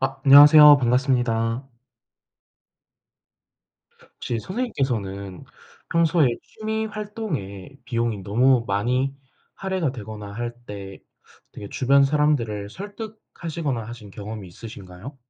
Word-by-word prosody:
아. 135 0 -1
안녕하세요 145 +1 +9
반갑습니다. 120 -1 0 2.5
혹시 120 - -3
선생님께서는 115 - -3 0.5
평소에 165 -3 +3
취미활동에 210 - -5
비용이 115 -4 -2
너무 120 +5 +3
많이 125 +7 0 0.4
할애가 190 -7 -2
되거나 105 -4 -8
할 120 +2 -5
때 100 -1 -8 0.5
되게 100 - -9
주변 140 +2 +3
사람들을 135 -8 0
설득하시거나 175 - -6
하신 115 -3 -10
경험이 105 -1 -8
있으신가요? 100 - -11
125 Hz, 260 characters per minute, -23 LUFS, 105-150 Hz, 2.5 s, 안녕하세요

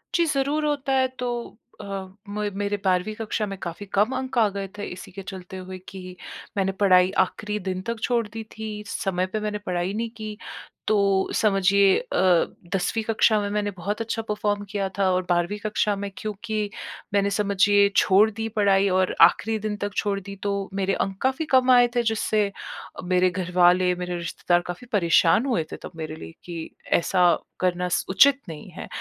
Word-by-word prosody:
जी, 340 - +4
ज़रूर 290 +1 0
होता 280 -2 0
है 260 0 +3
तो 245 -1 -1 0.5
अ, - - -9 0.4
मे 210 0 -2
मेरे 205 0 -1
12वीं 185 +3 +1
कक्षा 215 -1 -2
में 195 -1 -6
काफ़ी 175 +4 -6
कम 210 +6 +2
अंक 260 -1 -4
आ 225 - +5
गए 200 0 -5
थे 205 - -5
इसी 190 +2 -10
के 195 +2 -8
चलते 190 -1 -8
हुए 185 0 -7
कि 185 -1 -9 0.4
मैंने 195 -1 +1
पढ़ाई 185 -2 +4
आख़िरी 210 0 -5
दिन 185 0 -3
तक 230 -1 -3
छोड़ 235 -3 +1
दी 225 +1 -7
थी, 215 -1 -7
समय 185 -2 -1
पे 215 - -2
मैंने 210 0 -2
पढ़ाई 180 +1 -1
नहीं 230 +2 -2
की। 215 -1 -6 0.5
तो 215 - +3 0.4
समझिए 195 -1 +4
अ, - - -9 0.7
10वीं 220 +4 0
कक्षा 220 0 +3
में 205 - -2
मैंने 205 0 -1
बहुत 205 +5 -3
अच्छा 225 0 -2
परफ़ॉर्म 210 -1 -1
किया 200 -1 -1
था 195 -1 +3
और 185 0 +1
12वीं 175 +3 +1
कक्षा 210 -1 +1
में 200 0 -4
क्योंकि 215 0 -3 0.4
मैंने 200 0 +3
समझिए 200 0 +3
छोड़ 200 +3 +5
दी 225 +2 -4
पढ़ाई 200 -2 +3
और 185 0 +1
आख़िरी 220 +6 +5
दिन 215 0 -3
तक 205 -1 -4
छोड़ 200 -1 0
दी 200 +1 -9
तो 200 - 0 0.2
मेरे 195 0 0
अंक 195 0 -2
काफ़ी 265 +4 0
कम 260 -1 +5
आए 245 -1 +7
थे 240 - +2
जिससे 215 -2 +1 0.5
मेरे 180 0 +3
घरवाले, 180 0 +3
मेरे 180 0 -4
रिश्तेदार 175 +1 0
काफ़ी 180 +8 -7
परेशान 170 +3 +4
हुए 240 -12 +1
थे - - -5
तब - - -7
मेरे 155 -1 -5
लिए 80 - -10
कि 170 -2 -6 0.3
ऐसा 175 0 +3 0.2
करना 180 0 0
स - - +1
उचित 270 +9 +5
नहीं 155 -2 -8
है - - -8
200 Hz, 185 wpm, -24 LUFS, 185-220 Hz, 0.7 s, आए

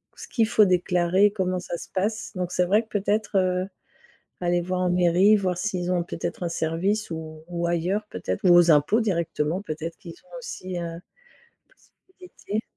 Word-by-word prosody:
ce - - -10
qu'il 225 -4 +1
faut 220 -2 +5
déclarer, 180 +1 +3
comment 185 -3 -1
ça 175 -1 -5
se - - -10
passe, 210 +3 -2
donc 180 -1 -3
c'est 180 - +2
vrai 205 +5 +3
que - - -24
peut-être, 205 0 0
heu, 185 0 +1 0.7
aller 175 0 +1
voir 180 +1 -2
en 180 - +1
mairie, 180 +4 +4
voir 185 -4 0
s'ils 180 -2 -2
ont 180 -1 +1
peut-être 175 - -5
un 170 - -1
service 175 +6 -1
ou 155 -1 -7
ou 170 -1 -2
ailleurs 175 +5 0
peut-être, 95 0 -4
ou 180 - +7
aux 175 -1 +6
impôts 155 +10 +4
directement, 170 -4 -1
peut-être 165 -3 -6
qu'ils 170 -5 -11
ont - - -11
aussi, 185 - -6
heu, - - -3
une 170 0 -6 1.3
possibilité. 215 - -4
180 Hz, 185 wpm, -25 LUFS, 170-200 Hz, 1.3 s, ou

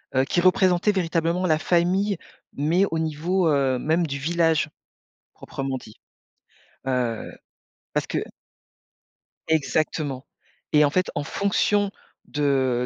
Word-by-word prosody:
heu, 130 - +4
qui 175 - +1
représentaient 185 +2 +4
véritablement 170 -1 0
la 155 -1 +3
famille 185 +4 +1 0.4
mais 160 +7 +2
au 165 - 0
niveau, 165 +3 0
heu, 135 -3 +2
même 165 +2 +1
du 140 0 -3
village 160 0 +1 0.7
proprement 135 -1 -4
dit. 110 -3 -15 0.9
Heu, 125 -3 -1 0.6
parce - - 0
que - - -1 1.3
Exactement, 150 -2 0 0.5
et 150 0 +6
en - - +2
fait, 185 +4 0
en 145 - -1
fonction 200 +3 +1 0.3
de 130 -4 +1
160 Hz, 115 wpm, -24 LUFS, 140-180 Hz, 1.3 s, et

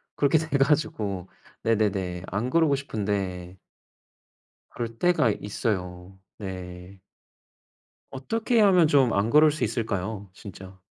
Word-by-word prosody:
그렇게 145 +2 +3
돼 155 -2 -1
가지고 135 - 0 0.3
네네네 100 -5 0
안 105 +6 -2
그러고 155 -1 +3
싶은데 95 -7 -4 1.1
그럴 115 -1 -6
때가 175 -10 +3
있어요. 95 -3 -4 0.2
네. 90 -1 -8 1.1
어떻게 225 - -1
하면 185 -6 +5
좀 135 -6 +3
안 100 +3 +1
그럴 150 +3 +6
수 150 - -4
있을까요 100 -3 -3
진짜? 95 -1 -11
110 Hz, 225 characters per minute, -25 LUFS, 95-140 Hz, 1.1 s, 그럴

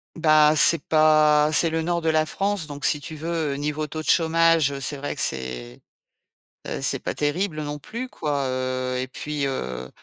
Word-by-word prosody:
Bah, 155 -2 +4
c'est 155 +1 +5
pas 155 -1 +4
c'est 165 +1 +3
le 160 0 -2
nord 170 0 -1
de 160 - 0
la 155 0 +2
France 195 +1 -2
donc 145 -1 -9
si 150 - +1
tu 155 +2 -9
veux, 160 -2 -2
niveau 150 +2 -3
taux 155 +1 -6
de - - -10
chômage, 165 -3 +3
heu, 140 - -5
c'est 145 +2 -3
vrai 145 +1 -4
que - - -3
c'est, 65 -2 -4 0.8
heu, - - -5
c'est - - 0
pas - - -4
terrible 155 +2 -2
non 145 0 -5
plus 235 - -7
quoi, 145 - -3
heu 130 0 -2
et 130 +1 -3
puis 150 +1 -4
heu 65 - -4
150 Hz, 200 wpm, -23 LUFS, 140-160 Hz, 0.8 s, c'est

